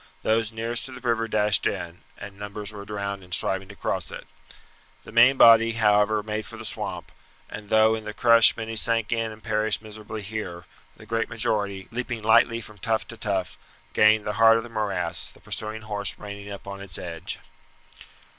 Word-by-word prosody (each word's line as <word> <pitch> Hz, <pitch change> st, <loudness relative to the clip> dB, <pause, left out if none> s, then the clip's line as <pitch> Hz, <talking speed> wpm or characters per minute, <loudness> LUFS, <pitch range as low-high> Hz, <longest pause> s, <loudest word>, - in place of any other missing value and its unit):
Those 110 Hz, 0 st, +1 dB
nearest 115 Hz, +2 st, -2 dB
to 130 Hz, -, -8 dB
the 125 Hz, 0 st, -7 dB
river 115 Hz, -1 st, +1 dB
dashed 105 Hz, -1 st, +2 dB
in, 85 Hz, 0 st, -5 dB, 0.2 s
and 100 Hz, -1 st, -9 dB
numbers 105 Hz, 0 st, -6 dB
were 100 Hz, -1 st, -8 dB
drowned 100 Hz, -1 st, -4 dB
in 90 Hz, -, -17 dB
striving 95 Hz, +1 st, +1 dB
to 100 Hz, -, -12 dB
cross -, -, -3 dB
it. -, -, -8 dB, 0.8 s
The -, -, -12 dB
main 120 Hz, +4 st, +6 dB
body, 115 Hz, -1 st, +7 dB
however, 105 Hz, -1 st, +3 dB
made 105 Hz, 0 st, -4 dB
for -, -, -10 dB
the -, -, -8 dB
swamp, -, -, -5 dB, 0.4 s
and 105 Hz, 0 st, -8 dB
though 110 Hz, 0 st, +5 dB
in 110 Hz, -1 st, -3 dB
the 105 Hz, -, -5 dB
crush 115 Hz, +1 st, +6 dB
many 115 Hz, 0 st, -5 dB
sank 115 Hz, -1 st, +1 dB
in 115 Hz, -1 st, 0 dB
and 110 Hz, 0 st, -13 dB
perished 110 Hz, -3 st, 0 dB
miserably 110 Hz, 0 st, -8 dB
here, 95 Hz, -5 st, -6 dB, 0.3 s
the 105 Hz, -, -14 dB
great 115 Hz, +1 st, -1 dB
majority, 105 Hz, -4 st, -1 dB
leaping 120 Hz, -1 st, -4 dB
lightly 115 Hz, +1 st, +4 dB
from 105 Hz, -1 st, -12 dB
tuft 110 Hz, +2 st, -1 dB
to 115 Hz, -, -8 dB
tuft, 100 Hz, -4 st, -2 dB, 0.4 s
gained 105 Hz, 0 st, +4 dB
the 105 Hz, -, -2 dB
heart 115 Hz, 0 st, +8 dB
of 115 Hz, -, -3 dB
the 120 Hz, -, -10 dB
morass, 95 Hz, -6 st, -2 dB
the -, -, -19 dB
pursuing 110 Hz, 0 st, -4 dB
horse 100 Hz, -3 st, -2 dB
reining 100 Hz, -1 st, -8 dB
up 100 Hz, -, -8 dB
on 100 Hz, 0 st, -7 dB
its 95 Hz, -4 st, -7 dB
edge. 85 Hz, 0 st, -5 dB
110 Hz, 195 wpm, -25 LUFS, 100-115 Hz, 0.8 s, heart